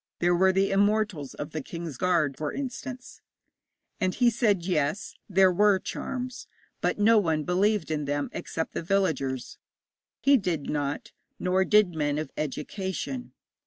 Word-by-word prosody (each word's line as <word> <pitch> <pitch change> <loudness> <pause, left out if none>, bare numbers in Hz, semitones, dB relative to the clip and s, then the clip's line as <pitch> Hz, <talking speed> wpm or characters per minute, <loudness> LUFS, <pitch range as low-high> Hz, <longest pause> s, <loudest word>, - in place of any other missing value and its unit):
There 175 +1 +2
were 190 +2 +4
the 195 +1 +1
Immortals 200 -7 +1
of 145 +1 -6
the 155 - -3
King's 165 0 -6
Guard, 165 -4 +1
for 150 +1 -3
instance.' 255 -1 -6 0.8
And 185 -3 0
he 245 -1 +4
said, 210 -6 +1
yes, 165 +1 -1 0.2
there 190 -1 +5
were 205 +2 +4
charms, 255 +6 -5 0.3
but - - 0
no 215 +2 +5
one 160 -5 0
believed 185 0 +1
in 150 -2 -1
them 145 0 -2
except 160 - -4
the - - -2
villagers. 160 -9 -1 0.6
He 275 +3 +5
did 175 - -2
not, 145 -1 -2 0.3
nor 185 +1 +2
did 210 -4 +4
men 145 -2 0
of 155 - -4
education. 190 - -4
185 Hz, 150 wpm, -27 LUFS, 155-210 Hz, 0.8 s, there